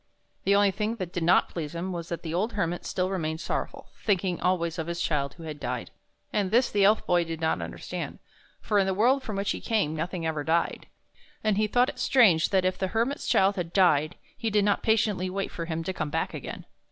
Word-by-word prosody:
The 200 - +4
only 200 -1 +4
thing 215 +3 -2
that 185 -5 -6
did 175 - -2
not 170 +2 +4
please 160 -2 -5
him 180 +3 -3
was' 170 -2 -5
that 170 - -4
the 160 -1 -4
old 210 +7 0
Hermit 175 -4 -2
still 185 +1 -1
remained 160 -4 -2
sorrowful, - - -4
thinking 190 -4 0
always 170 -2 0
of 160 - -3
his 170 0 -3
child 140 -5 -1
who 165 - -11
had 155 -2 -6
died; 125 -2 -4 0.4
and 200 -3 +1
this 240 +5 +3
the 205 -1 +2
Elf 210 +2 +4
Boy 175 -1 +3
did 165 -1 -5
not 160 - 0
understand, 85 - -5 0.4
for 210 - +2
in 195 - +2
the 190 - 0
world 250 +7 +3
from 220 -5 -5
which 200 0 0
he - - -4
came 200 -9 0
nothing 165 +2 -3
ever 155 -2 -1
died, 165 +3 0 0.6
and 215 -2 +2
he 215 0 +2
thought 245 +4 +3
it - - -8
strange 195 -12 +4
that 190 -2 +2
if 185 0 0
the 190 - 0
Hermit's 230 +8 -1
child 195 +1 +3
had 170 -2 -3
died 155 -6 +3 0.2
he 225 - -2
did 205 -1 +2
not 205 -1 +2
patiently 210 -4 +1
wait 195 +1 -3
for 165 - -5
him 165 0 -3
to 190 - -3
come 155 -4 -3
back - - -2
again. - - -7
185 Hz, 235 wpm, -27 LUFS, 165-205 Hz, 0.6 s, The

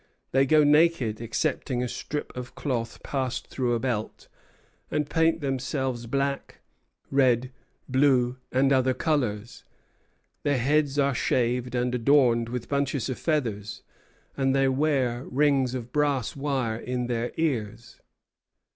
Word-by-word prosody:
They 135 +1 +3
go 155 +1 +5
naked, 145 -7 +3
excepting 125 +1 -1
a - - -1
strip 150 +4 -5
of 125 0 -7
cloth 120 -5 -3
passed 130 -2 -2
through 125 -2 0
a - - -1
belt, 115 -4 -3 0.6
and 150 -1 -1
paint 165 +1 +2
themselves 130 -3 -2
black, 140 +2 -2 0.5
red, 130 -2 +3 0.4
blue, 130 -2 +2
and 135 +2 +3
other 130 -1 +2
colors. 120 -7 -2 0.8
Their 145 -2 +1
heads 145 +3 +1
are 140 -1 +3
shaved 125 0 0
and 125 0 0
adorned 120 -2 +3
with 125 -1 -4
bunches 140 -3 -1
of 130 - -4
feathers, 115 -10 -2 0.5
and 135 -1 +1
they 135 0 +3
wear 130 -3 0
rings 135 -2 +2
of 120 -1 -6
brass 145 -5 0
wire 135 -6 -1
in 125 0 -3
their 120 0 -2
ears. 115 -8 -2
130 Hz, 130 wpm, -26 LUFS, 120-140 Hz, 0.8 s, go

